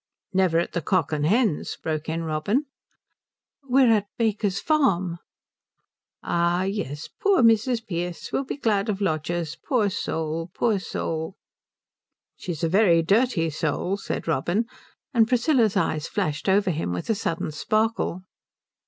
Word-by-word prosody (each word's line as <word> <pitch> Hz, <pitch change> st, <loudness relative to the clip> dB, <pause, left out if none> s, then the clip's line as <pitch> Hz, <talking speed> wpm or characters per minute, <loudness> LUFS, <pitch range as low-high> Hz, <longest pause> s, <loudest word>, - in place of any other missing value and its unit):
"Never 185 Hz, -3 st, +3 dB
at 170 Hz, -, 0 dB
the 170 Hz, -, -2 dB
Cock 185 Hz, +3 st, +1 dB
and 150 Hz, -1 st, 0 dB
Hens?" 210 Hz, -, +1 dB
broke 155 Hz, 0 st, -3 dB
in 165 Hz, +1 st, -2 dB
Robin. 165 Hz, -, 0 dB, 1.0 s
"We're 265 Hz, -3 st, +4 dB
at 210 Hz, -2 st, +2 dB
Baker's 210 Hz, -4 st, 0 dB
Farm." 190 Hz, -, +1 dB, 1.0 s
"Ah 175 Hz, +1 st, +1 dB
yes 185 Hz, -7 st, -3 dB
poor 390 Hz, -8 st, +4 dB
Mrs. 230 Hz, +1 st, +3 dB
Pearce 175 Hz, -3 st, -4 dB
will 275 Hz, -, 0 dB
be 265 Hz, -, -5 dB
glad 215 Hz, -6 st, +1 dB
of 200 Hz, -2 st, -1 dB
lodgers. 165 Hz, -2 st, -1 dB
Poor 220 Hz, -7 st, +1 dB
soul, 160 Hz, -2 st, -3 dB
poor 220 Hz, -4 st, +1 dB
soul." 160 Hz, -1 st, -4 dB, 1.0 s
"She's 175 Hz, -3 st, -6 dB
a -, -, +3 dB
very 175 Hz, -2 st, +4 dB
dirty 195 Hz, -3 st, +2 dB
soul," 155 Hz, +5 st, -1 dB
said 200 Hz, -, -5 dB
Robin; 175 Hz, -, +1 dB, 0.5 s
and 225 Hz, -3 st, +4 dB
Priscilla's 240 Hz, -3 st, +2 dB
eyes 155 Hz, 0 st, 0 dB
flashed 170 Hz, -5 st, -2 dB
over 195 Hz, 0 st, +3 dB
him 155 Hz, -, -2 dB
with 90 Hz, -, -4 dB
a -, -, +4 dB
sudden 165 Hz, -6 st, -2 dB
sparkle. 215 Hz, +2 st, 0 dB
190 Hz, 140 wpm, -25 LUFS, 165-225 Hz, 1.0 s, We're